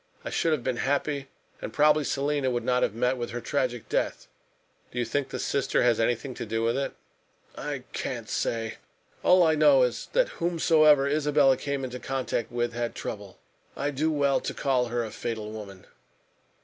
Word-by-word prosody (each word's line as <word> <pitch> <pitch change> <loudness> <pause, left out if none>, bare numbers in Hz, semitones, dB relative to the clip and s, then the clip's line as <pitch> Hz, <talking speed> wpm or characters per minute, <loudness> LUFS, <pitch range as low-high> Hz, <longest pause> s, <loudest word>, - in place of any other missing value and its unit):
I - - -4
should 165 - +1
have 150 -6 0
been 125 -1 -1
happy, 140 +2 -1 0.3
and - - -5
probably 150 0 +4
Selina 140 -1 0
would 120 -2 -1
not 125 +1 +1
have 105 - 0
met 125 +2 +1
with 120 -1 -4
her 120 - -4
tragic 125 -2 -2
death." - - -1 0.6
"Do - - -11
you 120 - +1
think 135 +4 -1
the - - -4
sister 140 - 0
has 120 -2 +3
anything 120 +3 0
to - - -6
do 115 +1 -1
with 115 +1 +1
it?" 140 0 -2 0.6
"I - - -5
can't - - -4
say. 115 -1 -2 0.4
All 180 0 +6
I 160 -1 +4
know 145 -4 +5
is 125 -1 -2
that - - +3
whomsoever 155 -4 +4
Isabella 145 -2 +3
came 140 +1 -3
into 125 -1 -5
contact 130 -4 -2
with 120 0 -1
had 120 0 -3
trouble. 100 -2 -6 0.4
I 145 +1 -1
do 155 +3 0
well 140 -2 +2
to - - -5
call 130 -3 +1
her 120 0 -1
a 110 - -7
fatal 110 -1 -4
woman." 100 -4 -9
130 Hz, 190 wpm, -27 LUFS, 120-145 Hz, 0.6 s, All